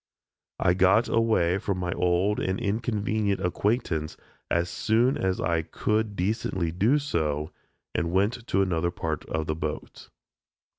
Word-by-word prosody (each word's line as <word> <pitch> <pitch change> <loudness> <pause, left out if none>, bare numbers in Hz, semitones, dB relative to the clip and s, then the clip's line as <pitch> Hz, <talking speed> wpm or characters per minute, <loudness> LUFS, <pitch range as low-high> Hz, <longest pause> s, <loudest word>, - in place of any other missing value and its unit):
I 90 - +3
got 95 +5 +4
away 110 -6 +2
from 100 -1 -2
my 90 -1 -2
old 90 +4 +1
and 95 0 -1
inconvenient 105 -2 0
acquaintance 90 -4 -1 0.3
as 85 +1 +1
soon 115 +8 +2
as 95 -1 -1
I 85 0 +1
could 105 +6 -1
decently 95 -3 -1
do 105 - +3
so, 80 - -1 0.4
and 85 +2 -1
went 105 +6 0
to 95 +1 +2
another 85 -2 0
part 80 -3 -4
of 80 0 -2
the 80 - -1
boat. 75 -1 -6
95 Hz, 140 wpm, -26 LUFS, 85-110 Hz, 0.4 s, got